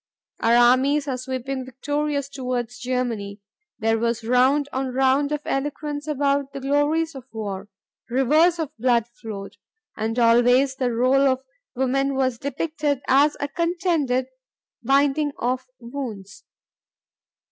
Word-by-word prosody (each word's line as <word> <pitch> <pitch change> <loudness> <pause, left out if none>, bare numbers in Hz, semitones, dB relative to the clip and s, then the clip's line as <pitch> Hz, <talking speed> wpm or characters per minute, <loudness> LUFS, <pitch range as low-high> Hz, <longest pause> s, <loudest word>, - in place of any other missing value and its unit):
Our 230 +1 +3
armies 260 +4 +4
were 270 -3 -2
sweeping 260 +1 -4
victorious 285 +2 -2
toward 255 -4 -3
Germany. 245 -5 -3 0.4
There 225 0 +1
was 235 0 -1
round 260 +5 +3
on 265 +1 -1
round 270 +3 +2
of 300 -1 -1
eloquence 290 +2 -3
about 280 -1 0
the 275 - -5
glories 290 +4 +1
of 265 -2 -10
war. 205 -2 -5 0.4
Rivers 305 +8 +3
of 310 -2 -4
blood 235 -2 +3
flowed. 210 -4 -8 0.4
And 225 +2 -2
always 245 +3 +4
the 255 -2 0
role 255 +4 +3
of 260 0 0 0.3
woman 270 +2 0
was 260 -3 0
depicted 290 -1 -2
as 285 +3 +4
a 285 - -1
contented 335 -6 0 0.6
binding 280 +3 +2
of 255 +2 -2
wounds. 235 -6 -7
265 Hz, 125 wpm, -23 LUFS, 245-285 Hz, 0.6 s, armies